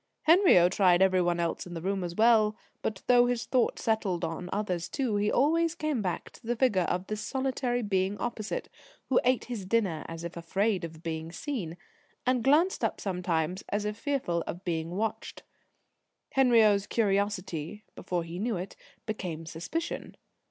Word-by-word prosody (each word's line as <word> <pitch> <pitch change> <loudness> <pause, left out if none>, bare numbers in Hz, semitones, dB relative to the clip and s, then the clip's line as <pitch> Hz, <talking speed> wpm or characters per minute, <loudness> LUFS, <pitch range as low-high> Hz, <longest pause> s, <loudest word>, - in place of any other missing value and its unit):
Henriot 320 - +6
tried 180 -3 +4
every 185 -1 +4
one 175 -1 +1
else 170 +1 -2
in 175 - -8
the 165 - -5
room 195 0 -1
as 175 -1 -4
well; 215 -1 +4 0.3
but, 205 -3 -3
though 245 -1 +5
his 245 -2 -1
thought 255 -2 +1
settled 205 -6 0
on 165 +2 -5
others 185 -4 -2
too, 255 -7 -1
he 210 +1 +1
always 330 +4 +2
came 305 -7 -1
back 180 -3 -3
to 230 - -15
the 240 - +1
figure 220 -8 +2
of 180 +1 -1
this 215 +1 -4
solitary 255 0 -1
being 195 0 0
opposite, 230 -3 -3 0.4
who 260 - +4
ate 255 0 +2
his 235 -5 -5
dinner 190 -6 0
as 165 0 -7
if 170 0 -6
afraid 190 +4 0
of 160 -1 -8
being 160 -1 -4
seen, 180 - -4 0.5
and 250 -2 +2
glanced 315 +8 +3
up - - 0
sometimes 180 -2 -1
as 205 +1 -1
if 210 0 -2
fearful 230 - -1
of 175 +2 -6
being 165 -2 -2
watched. 210 +5 -3 0.9
Henriot's 225 -6 +4
curiosity, 200 -4 -1
before 175 -2 -3
he 170 +2 -7
knew 220 -1 -1
it, 185 +2 -6 0.3
became 180 -7 -4
suspicion. 175 - -4
205 Hz, 170 wpm, -29 LUFS, 175-240 Hz, 0.9 s, Henriot